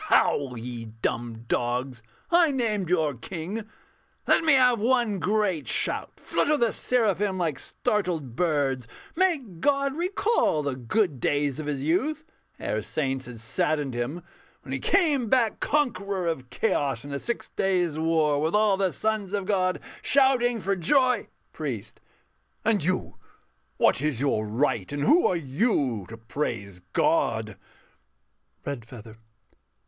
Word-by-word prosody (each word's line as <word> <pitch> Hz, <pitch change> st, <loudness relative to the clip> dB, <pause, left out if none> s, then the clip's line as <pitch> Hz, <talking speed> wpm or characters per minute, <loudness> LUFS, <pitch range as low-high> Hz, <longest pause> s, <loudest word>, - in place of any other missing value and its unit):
_] -, -, -8 dB
Howl! 130 Hz, -4 st, +2 dB
ye 120 Hz, 0 st, -6 dB
dumb 115 Hz, +1 st, -4 dB
dogs, 125 Hz, +1 st, -1 dB, 0.3 s
I 340 Hz, -1 st, +6 dB
named 220 Hz, -, -1 dB
your 160 Hz, -5 st, +2 dB
King 185 Hz, -, -6 dB, 0.6 s
let -, -, +4 dB
me 320 Hz, -2 st, +5 dB
have 250 Hz, -4 st, +4 dB
one 235 Hz, -4 st, +2 dB
great 190 Hz, -5 st, 0 dB
shout, -, -, 0 dB
Flutter 305 Hz, 0 st, +1 dB
the 235 Hz, -4 st, +2 dB
seraphim 205 Hz, -5 st, +1 dB
like 160 Hz, -7 st, -1 dB
startled 180 Hz, -, -2 dB
birds; 140 Hz, -7 st, 0 dB, 0.3 s
Make 280 Hz, -, 0 dB
God 275 Hz, +4 st, +1 dB
recall 360 Hz, -, +1 dB
the 140 Hz, -2 st, -2 dB
good 135 Hz, -, 0 dB
days 145 Hz, +1 st, 0 dB
of 155 Hz, -, -5 dB
His 140 Hz, -2 st, -2 dB
youth 300 Hz, -, 0 dB, 0.3 s
Ere -, -, -2 dB
saints 135 Hz, -3 st, -2 dB
had 120 Hz, -2 st, -9 dB
saddened 140 Hz, +4 st, -1 dB
Him: 130 Hz, +9 st, -3 dB, 0.4 s
when -, -, -9 dB
He -, -, -1 dB
came 300 Hz, -, +2 dB
back 235 Hz, -3 st, +2 dB
Conqueror 200 Hz, -10 st, 0 dB
of 135 Hz, -7 st, -3 dB
Chaos 135 Hz, 0 st, 0 dB
in 145 Hz, -, -6 dB
a 140 Hz, -, -2 dB
six 235 Hz, +8 st, -4 dB
days' 180 Hz, -5 st, 0 dB
war, 160 Hz, -3 st, +2 dB
With 160 Hz, +5 st, 0 dB
all 210 Hz, -2 st, +4 dB
the 190 Hz, -2 st, +1 dB
sons 215 Hz, -1 st, -1 dB
of 200 Hz, -2 st, -2 dB
God 185 Hz, -2 st, +1 dB, 0.2 s
shouting 255 Hz, -4 st, +3 dB
for 195 Hz, 0 st, 0 dB
joy... 255 Hz, -, +2 dB, 0.3 s
PRIEST. -, -, -5 dB, 0.6 s
And 215 Hz, -7 st, +2 dB
you 185 Hz, +3 st, -1 dB, 0.6 s
what -, -, +3 dB
is 150 Hz, -5 st, -1 dB
your 120 Hz, -6 st, 0 dB
right, 115 Hz, -2 st, 0 dB
and 145 Hz, 0 st, -2 dB
who 340 Hz, -, +5 dB
are 185 Hz, -, +1 dB
you, 135 Hz, -, 0 dB
To 115 Hz, -, -8 dB
praise 110 Hz, -5 st, -4 dB
God? -, -, +1 dB, 1.1 s
REDFEATHER. 115 Hz, -4 st, -7 dB
170 Hz, 145 wpm, -26 LUFS, 135-225 Hz, 1.1 s, I